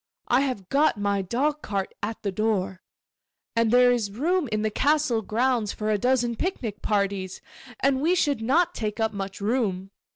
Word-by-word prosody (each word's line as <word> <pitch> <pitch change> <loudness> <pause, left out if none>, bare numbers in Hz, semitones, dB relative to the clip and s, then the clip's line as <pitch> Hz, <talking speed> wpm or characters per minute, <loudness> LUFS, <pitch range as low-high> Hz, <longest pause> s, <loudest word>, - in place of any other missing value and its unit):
I 245 +2 +3
have 255 -9 -2
got 285 -3 +3
my 200 -1 0
dog 285 +10 -1
cart 195 -2 -3
at 220 +2 -4
the 200 - -1
door, 190 -3 -1 0.7
and 230 -1 +3
there 245 +1 +6
is 230 -4 0
room 300 - 0
in 215 0 0
the 215 - 0
castle 285 -2 +2
grounds 230 0 0
for 215 0 -2
a 210 - +1
dozen 245 0 +1
picnic 235 - -3
parties; 200 -2 -1 0.4
and 270 -1 +2
we 340 +5 +3
should 290 -8 +1
not 335 +10 +2
take 215 -1 -4
up 220 -1 0
much 195 -1 -5
room. 200 -4 -1
225 Hz, 175 wpm, -25 LUFS, 200-265 Hz, 0.7 s, there